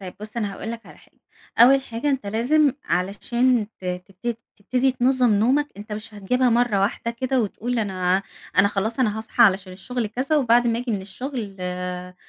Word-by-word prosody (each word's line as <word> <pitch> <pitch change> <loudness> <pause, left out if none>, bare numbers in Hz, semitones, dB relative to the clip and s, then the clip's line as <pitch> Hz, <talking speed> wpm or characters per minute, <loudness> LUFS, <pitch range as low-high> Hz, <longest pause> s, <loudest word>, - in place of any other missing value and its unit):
طيب 185 -2 -8
بُص 215 +2 -9
أنا 205 -4 -1
هاقول 225 - -6
لك 230 0 -8
على - - -14
حاجة، - - -25 0.4
أول 265 +3 +7
حاجة 245 +3 -2
أنت 265 -6 -2
لازم 255 +7 +2
علشان 210 +6 +1
ت - - -13
تبت 190 +6 -4 0.2
تبتدي 255 +5 +1
تنظم 250 -3 +3
نومك 265 +8 +2
أنت 210 +1 -9
مش 215 +1 -7
هتجيبها 250 +6 +1
مرة 235 -4 +2
واحدة 230 +3 -1
كده 255 +2 0
وتقول 230 +3 -2
أنا 190 -2 0 0.4
أنا 200 +1 +6
خلاص 220 +5 -2
أنا 220 -3 +1
هاصحى 225 +2 +1
علشان 190 -3 +3
الشغل 230 +5 -3
كذا 260 +8 -1
وبعد 240 -3 +4
ما 230 0 +1
آجي 245 -1 -4
من 195 -2 -2
الشغل 220 -1 -6
آآ، 180 0 -5
225 Hz, 185 wpm, -23 LUFS, 195-250 Hz, 0.4 s, أول